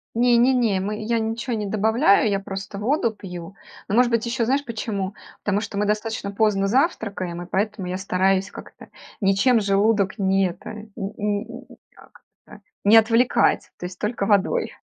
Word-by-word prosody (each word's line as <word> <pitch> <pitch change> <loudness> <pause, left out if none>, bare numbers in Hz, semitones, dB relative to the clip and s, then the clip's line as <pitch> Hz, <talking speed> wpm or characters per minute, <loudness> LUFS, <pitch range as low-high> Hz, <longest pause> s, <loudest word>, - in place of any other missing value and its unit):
Не 240 0 +4
не 255 +3 +4
не, 225 -6 +1
мы 210 +3 -3
я 230 +1 0
ничего 225 +2 -2
не 210 -1 -3
добавляю, 215 +1 +3
я 195 -1 0
просто 195 +1 -7
воду 230 +1 +1
пью. 180 -2 -9 0.3
Ну, 205 - -1
может 245 0 +4
быть, 230 0 +1
ещё 235 -1 0
знаешь 275 +4 +1
почему? 210 -4 -4 0.3
Потому 205 0 +1
что 200 -2 -6
мы 210 0 0
достаточно 215 -1 -2
поздно 200 -2 +1
завтракаем, 200 - -1
и 175 - -7
поэтому 205 0 -2
я 185 - -3
стараюсь 190 0 0
как-то - - -12 0.3
ничем 200 +5 +3
желудок 200 0 +1
ни 195 0 +2
это, 180 +1 -8
м 215 0 -10 0.3
м 210 +5 -3
м, - - -16 0.2
как-то 210 0 -19 0.2
не 210 +3 +6
отвлекать, 230 +2 +3
то 180 - -6
есть 180 - -12
только 210 -2 -2
водой. 200 -2 +1
210 Hz, 175 wpm, -23 LUFS, 195-230 Hz, 0.3 s, не